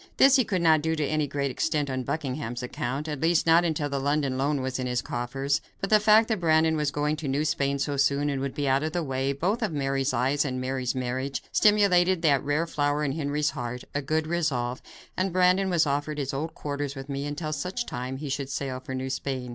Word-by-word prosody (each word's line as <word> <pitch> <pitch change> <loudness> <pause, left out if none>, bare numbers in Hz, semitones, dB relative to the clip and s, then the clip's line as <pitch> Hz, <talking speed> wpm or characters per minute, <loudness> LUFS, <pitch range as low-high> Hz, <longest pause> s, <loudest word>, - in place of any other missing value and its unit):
This 270 0 +7
he 260 - +4
could 185 -6 -1
not 160 -2 +5
do 160 +1 0
to 155 -2 0
any 155 0 0
great 140 0 -2
extent, 150 +3 0
on 130 -1 -2
Buckingham's 130 -3 -3
account; 125 +4 -3
at 150 -3 -4
least, 165 0 +3
not 165 +1 +5
until 155 -3 0
the 140 -1 -2
London 140 -1 0
loan 140 +2 0
was 130 0 -3
in 130 - -2
his 125 -1 0
coffers, 135 +6 -2 0.2
but 195 - -3
the 215 - +7
fact 215 +1 +5
that 220 -3 0
Brandon 160 -1 +3
was 150 -2 0
going 150 +1 -1
to 150 - -5
New 140 +3 0
Spain 140 -2 0
so 140 +1 -2
soon 140 +1 +2
and 140 -2 -1
would 140 -1 -3
be 145 -1 -1
out 135 +1 +3
of 155 +1 -3
the 175 - -1
way, 135 -1 -1
both 180 - -1
of 215 - 0
Mary's 135 -2 0
eyes 130 +4 +1
and 130 -3 -3
Mary's 130 0 -2
marriage, 130 +2 -3
stimulated 185 -4 +4
that 140 -4 +3
rare 145 +3 0
flower 145 -2 0
in 140 - 0
Henry's 150 0 -1
heart, 120 +1 -5
a 145 - -1
good 155 +3 0
resolve, 140 -7 -1 0.3
and 185 0 0
Brandon 185 +2 +3
was 170 -3 +3
offered 145 +1 -1
his 140 -2 -3
old 155 +4 -4
quarters 145 -1 -4
with 135 0 -7
me 140 0 -3
until 155 +1 -4
such 180 +11 -3
time 125 +2 -5
as 135 - -8
he 150 - -4
should 135 0 -3
sail 135 -2 -3
for 130 0 -6
New 130 0 -3
Spain. 130 -2 -3
145 Hz, 240 wpm, -26 LUFS, 135-160 Hz, 0.3 s, This